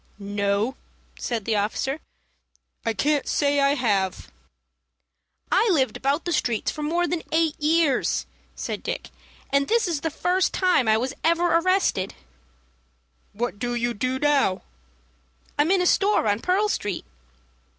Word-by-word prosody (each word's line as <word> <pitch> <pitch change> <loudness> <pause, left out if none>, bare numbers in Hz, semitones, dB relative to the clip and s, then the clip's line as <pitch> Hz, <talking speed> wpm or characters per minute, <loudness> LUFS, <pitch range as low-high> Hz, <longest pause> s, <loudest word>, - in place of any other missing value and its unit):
"No," 205 +4 -1 0.4
said 230 -5 -3
the 225 - +1
officer, 245 +8 -1 0.8
"I 230 - 0
can't 290 +4 +1
say 285 -1 +2
I 280 +1 +3
have." 200 -8 -1 1.2
"I 455 - +4
lived 265 -9 +2
about 280 +4 -1
the 345 - -1
streets 235 -7 0
for 305 - -7
more 340 +4 +1
then 345 -1 -2
eight 320 -1 +2
years," 305 -3 +2 0.3
said - - -4
Dick, - - -5 0.4
"and 280 0 +2
this 460 -3 +2
is 325 -5 -2
the 325 - -1
first 360 +4 0
time 360 - +3
I 220 0 +4
was 255 +4 -2
ever 335 +1 +3
arrested." 345 - +1 1.2
"What 205 -2 -3
do 240 +1 -2
you 240 0 0
do 255 +4 -1
now?" 275 -9 +2 1.0
"I'm 295 +3 +3
in 375 -1 +3
a - - 0
store 395 - +3
on 205 0 +2
Pearl 375 - +1
Street." 205 - -3
280 Hz, 145 wpm, -24 LUFS, 225-335 Hz, 1.2 s, I